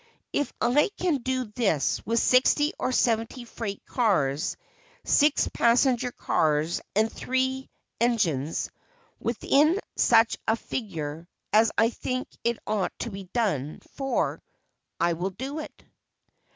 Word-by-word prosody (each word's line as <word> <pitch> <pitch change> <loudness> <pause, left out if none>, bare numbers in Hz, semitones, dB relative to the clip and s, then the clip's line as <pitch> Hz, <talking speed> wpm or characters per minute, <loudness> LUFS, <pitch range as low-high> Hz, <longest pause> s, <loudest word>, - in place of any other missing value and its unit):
If 290 - 0
I 265 +8 +3
can 350 -5 +1
do 260 0 -2
this 210 - 0
with 230 +1 +1
sixty 260 +5 +4
or 255 - 0
seventy 235 0 0
freight 215 -4 -6
cars, 155 - +1 0.5
six 295 0 +3
passenger 245 +1 +3
cars 155 -5 0
and 220 +2 +2
three 260 +1 -1 0.3
engines, 170 - 0 0.5
within 290 - +2 0.2
such 225 -1 +4
a 220 - +3
figure 165 - -5 0.3
as 220 +1 +5
I 225 +1 +4
think 255 +1 -3 0.2
it 235 -1 +1
ought 210 -3 -1
to 235 - -4
be 195 -1 -7
done 180 - -1
for, 270 -1 -1 0.6
I 170 0 +2
will 175 +3 -2
do 265 - -6
it." 310 - -9
230 Hz, 125 wpm, -26 LUFS, 190-260 Hz, 0.6 s, as